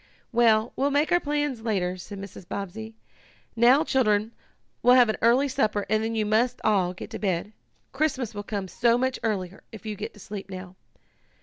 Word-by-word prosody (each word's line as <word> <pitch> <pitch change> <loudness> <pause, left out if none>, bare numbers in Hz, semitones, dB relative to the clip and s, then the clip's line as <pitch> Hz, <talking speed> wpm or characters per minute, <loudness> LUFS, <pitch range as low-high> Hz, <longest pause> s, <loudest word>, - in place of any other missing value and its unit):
"Well, 230 -1 +3
we'll 275 +2 +1
make 290 +2 +1
our 350 - +5
plans 290 -5 -2
later," 190 -5 -1
said 190 +3 -9
Mrs. 195 -2 -10
Bobbsey. 220 +4 -6 0.6
"Now, 245 +6 +5
children, 220 -7 +1 0.5
we'll 245 +1 +6
have 245 -3 +6
an 220 - 0
early 245 +5 +4
supper 215 -7 0
and 215 0 +2
then 225 +1 -2
you 215 -1 +1
must 220 +4 +1
all 190 -4 +2
get 200 - -9
to 220 - -5
bed. 195 +1 -2 0.4
Christmas 265 -5 -1
will 205 - -4
come 200 -2 -4
so 235 +6 +2
much 260 +1 -1
earlier 195 -4 -3
if 220 -3 -11
you 215 -1 -3
go - - -4
to 210 - -18
sleep 200 0 -8
now." 185 -1 -8
220 Hz, 190 wpm, -26 LUFS, 200-250 Hz, 0.6 s, we'll